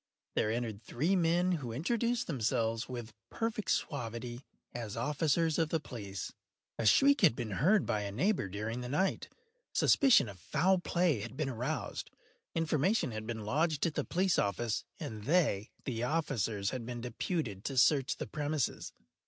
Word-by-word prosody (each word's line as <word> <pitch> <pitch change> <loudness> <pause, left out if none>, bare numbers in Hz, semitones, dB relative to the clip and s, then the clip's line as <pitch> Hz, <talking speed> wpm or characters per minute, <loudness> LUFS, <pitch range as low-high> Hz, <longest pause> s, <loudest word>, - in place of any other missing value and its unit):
There 105 - +1
entered 110 -2 -2
three 150 - 0
men, 175 +1 +3
who 140 -9 -2
introduced 235 - 0
themselves, 115 -4 0
with 120 -3 -6 0.2
perfect 225 -2 -2
suavity, 120 -1 -2 0.3
as 115 -3 -5
officers 150 +5 +1
of 160 -2 +2
the 165 - +1
police. 100 - -6 0.5
A 110 - +2
shriek 280 - +6
had 170 - +6
been 115 -4 -4
heard 185 - +3
by 105 - 0
a 100 -1 -3
neighbour 175 - +1
during 110 +5 -3
the 125 - -5
night; 190 +8 0 0.5
suspicion 255 - +5
of 100 -3 -10
foul 185 - +2
play 175 -7 +1
had 115 +4 -7
been 150 -3 -1
aroused; 130 +5 -3 0.5
information 165 - +1
had 110 0 -5
been 110 -2 -4
lodged 155 +6 +1
at 165 - 0
the - - -1
police 185 0 +1
office, 105 +3 -1
and 105 -2 -6
they 145 - +2 0.2
(the 115 -4 -2
officers) 120 - 0
had 130 -3 -4
been 120 0 -5
deputed 120 - -3
to 135 - -3
search 135 0 +4
the - - -4
premises. 150 -3 -2
130 Hz, 160 wpm, -32 LUFS, 115-165 Hz, 0.5 s, shriek